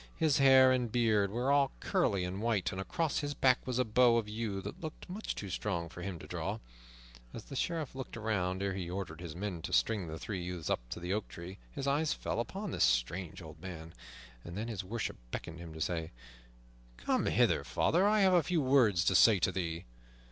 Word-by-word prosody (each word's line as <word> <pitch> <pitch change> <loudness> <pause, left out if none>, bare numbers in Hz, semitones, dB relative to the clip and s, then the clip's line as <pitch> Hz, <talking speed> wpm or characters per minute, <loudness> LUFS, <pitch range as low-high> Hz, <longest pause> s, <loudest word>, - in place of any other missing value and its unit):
His 155 -3 +2
hair 130 -1 +7
and 125 -3 +1
beard 110 -4 +3
were 120 +6 0
all 140 -1 +3
curly 115 - +1
and 90 +3 -4
white, 110 -5 +1
and 95 - -4
across 160 +9 -1
his 145 -1 -3
back 130 -2 +4
was 125 -2 -1
a 125 - +2
bow 115 +1 +5
of 115 -2 -1
yew 105 -2 -3
that - - -7
looked 155 -1 -7
much 195 +4 -4
too 100 -2 -6
strong 85 -4 -2
for 90 - -9
him 90 -1 -4
to - - -11
draw. - - -3 0.8
As 115 - -7
the 135 - -9
Sheriff 160 +2 -2
looked 130 -2 -7
around 100 -4 -1
ere 100 -1 0
he 90 -2 -4
ordered 90 -3 -5
his 85 -3 -7
men 90 -2 -4
to - - -6
string 105 -6 +2
the 80 0 -5
three 95 +1 -4
youths 90 -2 -4
up - - +2
to - - -5
the 90 +2 -2
oak 105 0 -2
tree, 90 +3 -9
his 140 - -5
eyes 145 +3 +2
fell - - -3
upon 195 - -4
this - - +1
strange 80 +9 0
old 80 0 -11
man. 85 -3 -8 0.5
Then 100 +7 -5
his 105 -4 -4
worship 110 +5 -4
beckoned 85 +6 -6
to - - -8
him, 80 -1 -9
saying, 80 0 -2 0.9
"Come - - 0
hither, - - +3
father, 180 +5 +2
I 210 0 +4
have 190 -1 +5
a 175 - +6
few 175 +1 0
words 120 -10 +4
to - - +3
say 110 -3 +7
to 95 - +1
thee." 85 -2 -3
105 Hz, 220 wpm, -32 LUFS, 90-130 Hz, 0.9 s, hair